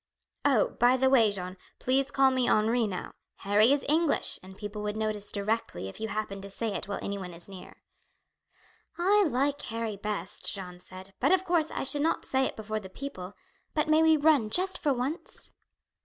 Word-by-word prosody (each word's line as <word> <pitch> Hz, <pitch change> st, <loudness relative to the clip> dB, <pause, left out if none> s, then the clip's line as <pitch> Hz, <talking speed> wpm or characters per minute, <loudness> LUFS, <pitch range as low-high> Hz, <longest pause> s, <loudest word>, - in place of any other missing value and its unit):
"Oh, 270 Hz, -7 st, +3 dB
by 245 Hz, +2 st, +5 dB
the 265 Hz, 0 st, +3 dB
way, 230 Hz, -5 st, +6 dB
Jeanne, 185 Hz, -2 st, -5 dB, 0.2 s
please 270 Hz, +2 st, +1 dB
call 270 Hz, -2 st, +4 dB
me 255 Hz, -1 st, +1 dB
Henri 225 Hz, +2 st, +3 dB
now; 185 Hz, -3 st, -5 dB, 0.3 s
Harry 210 Hz, +5 st, +4 dB
is 285 Hz, -1 st, +1 dB
English, 315 Hz, +1 st, +2 dB
and 190 Hz, +1 st, -13 dB
people 210 Hz, 0 st, -6 dB
would 210 Hz, 0 st, -3 dB
notice 215 Hz, -2 st, -1 dB
directly 200 Hz, -, -2 dB
if 95 Hz, -, -9 dB
you 220 Hz, -, -2 dB
happened 210 Hz, -2 st, -4 dB
to 200 Hz, -, -8 dB
say 225 Hz, +3 st, -3 dB
it 200 Hz, -, -4 dB
while 200 Hz, -, -3 dB
anyone 190 Hz, -3 st, -5 dB
is 170 Hz, -, -13 dB
near." 190 Hz, -2 st, -12 dB, 1.1 s
"I 400 Hz, +4 st, +4 dB
like 280 Hz, +3 st, 0 dB
Harry 225 Hz, -2 st, -4 dB
best," 205 Hz, -2 st, -3 dB
Jeanne 180 Hz, -3 st, -7 dB
said; 185 Hz, +1 st, -11 dB
"but, -, -, +2 dB
of 375 Hz, 0 st, +3 dB
course, 335 Hz, -3 st, +2 dB
I -, -, -3 dB
should 285 Hz, +2 st, 0 dB
not 320 Hz, -, +1 dB
say 265 Hz, 0 st, +1 dB
it -, -, -3 dB
before 215 Hz, 0 st, -4 dB
the 190 Hz, -3 st, -10 dB
people; 190 Hz, -5 st, -7 dB, 0.4 s
but 305 Hz, -1 st, +1 dB
may 310 Hz, +1 st, +5 dB
we 320 Hz, -1 st, +5 dB
run 290 Hz, -7 st, +3 dB
just 365 Hz, -, +1 dB
for 290 Hz, -, +1 dB
once?" 265 Hz, +6 st, -4 dB
220 Hz, 195 wpm, -28 LUFS, 200-280 Hz, 1.1 s, way